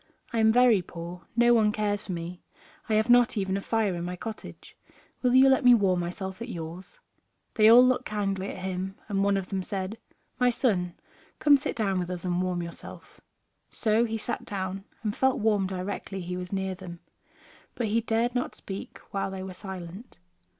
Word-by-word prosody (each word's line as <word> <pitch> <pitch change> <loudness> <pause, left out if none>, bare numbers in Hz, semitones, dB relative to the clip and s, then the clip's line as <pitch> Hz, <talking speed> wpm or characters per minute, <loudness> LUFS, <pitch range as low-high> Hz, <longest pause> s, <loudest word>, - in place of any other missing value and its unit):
I 230 - +1
am 220 0 +5
very 240 -4 +5
poor, 175 +1 -9
no 240 0 +5
one 215 -2 +4
cares 210 -1 -1
for - - -4
me, 175 +1 -5 0.5
I 215 - +3
have 215 +1 +2
not 245 -1 +5
even 190 -1 0
a 200 - -2
fire 220 -2 0
in 170 -1 -4
my 180 +1 -4
cottage; 220 +4 -9 0.5
will 250 -1 +3
you 265 +1 +8
let 265 -1 +4
me 245 -1 +8
warm 190 -5 +2
myself 190 +3 -5
at 235 - -5
yours?" 170 -1 -8 0.5
They 215 -1 +6
all 245 +2 +9
looked 255 0 +1
kindly 195 -2 -2
at 185 - -7
him, 190 +1 -3
and 195 -2 0
one 200 0 +3
of 190 -1 -4
them 195 -2 -1
said: 195 +3 -4 0.4
"My 250 0 +4
son, 190 -8 0 0.4
come 290 -1 +6
sit 270 - -2
down 195 -4 0
with 175 -1 -3
us 180 -1 -5
and 180 0 0
warm 180 -1 -1
yourself." 170 0 -11 0.5
So 220 +1 +1
he 225 -1 -2
sat 235 +2 -3
down, 195 0 -4 0.2
and 210 -2 -1
felt 265 -1 +2
warm 210 -3 +2
directly 190 +1 -4
he 180 +1 -4
was 180 0 -6
near 190 -1 -1
them. 175 -2 -10 0.7
But 240 - -1
he 230 +2 +2
dared 230 +2 0
not 250 0 -2
speak 195 0 -8
while 195 0 -1
they 190 -1 -6
were 190 -1 -7
silent. 190 +3 -9
195 Hz, 200 wpm, -27 LUFS, 185-225 Hz, 0.7 s, all